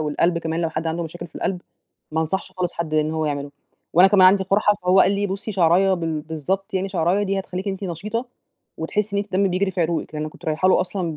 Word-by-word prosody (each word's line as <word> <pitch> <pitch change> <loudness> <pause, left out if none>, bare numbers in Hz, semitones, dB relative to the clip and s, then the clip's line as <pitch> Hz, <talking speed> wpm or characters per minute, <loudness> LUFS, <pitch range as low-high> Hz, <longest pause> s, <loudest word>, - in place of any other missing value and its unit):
والقلب 160 +3 +1
كمان 165 0 -2
لو 165 -1 -1
حد 160 +1 -3
عنده 165 +1 -1
مشاكل 170 +1 -7
في - - -27
القلب، 180 -2 -2 0.5
ما 160 - +1
أنصحش 175 +5 -2
خالص 180 -1 -2
حد 160 -2 -4
إن 155 0 +2
هو 160 -1 -1
يعمله، 145 -1 -3 0.4
وأنا 180 +3 +7
كمان 190 -2 +6
عندي 190 +1 +5
قرحة. 205 +2 +3
فهو 180 +1 +5
قال 190 - +4
لي: 200 0 0
"بصي 200 +2 -4
شعراية 185 +2 +4
بال 165 -3 -2
بالضبط، 175 +7 -3
يعني 190 +1 0
شعراية 185 +2 +1
دي 195 -1 0
هتخليكِ 190 +1 -4
أنتِ 195 +1 -4
نشيطة 210 +8 -3 0.5
وتحسي 200 +5 -1
إن - - +2
أنتِ 200 -2 -10
الدم 195 +1 +3
بيجري 190 +2 0
في 185 -1 -3
عروقِك." 165 -1 -1
لأن 150 - -3
أنا 155 - -4
كنت - - -17
رايحة 160 +4 +1
له - - +5
أصلًا 180 -4 -3
180 Hz, 240 wpm, -22 LUFS, 160-195 Hz, 0.5 s, وأنا